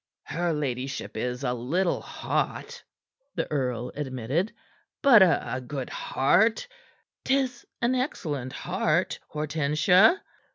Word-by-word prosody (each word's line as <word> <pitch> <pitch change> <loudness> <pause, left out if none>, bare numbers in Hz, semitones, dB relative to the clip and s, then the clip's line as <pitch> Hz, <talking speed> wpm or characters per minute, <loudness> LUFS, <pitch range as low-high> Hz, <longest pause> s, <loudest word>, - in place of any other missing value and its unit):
"Her 175 0 -1
ladyship 135 -3 -3
is 125 +1 -3
a 125 -2 0
little 160 +10 0
hot," - - -3 0.5
the - - 0
earl 125 -4 -1
admitted, 140 - -2 0.5
"but 250 -7 +8
a 165 -7 +2
good 130 0 -5
heart; 220 - +2 0.6
'tis 265 -3 0 0.2
an 240 +2 +3
excellent 150 - -2
heart, - - 0
Hortensia." 155 - +3
150 Hz, 100 wpm, -27 LUFS, 130-190 Hz, 0.6 s, but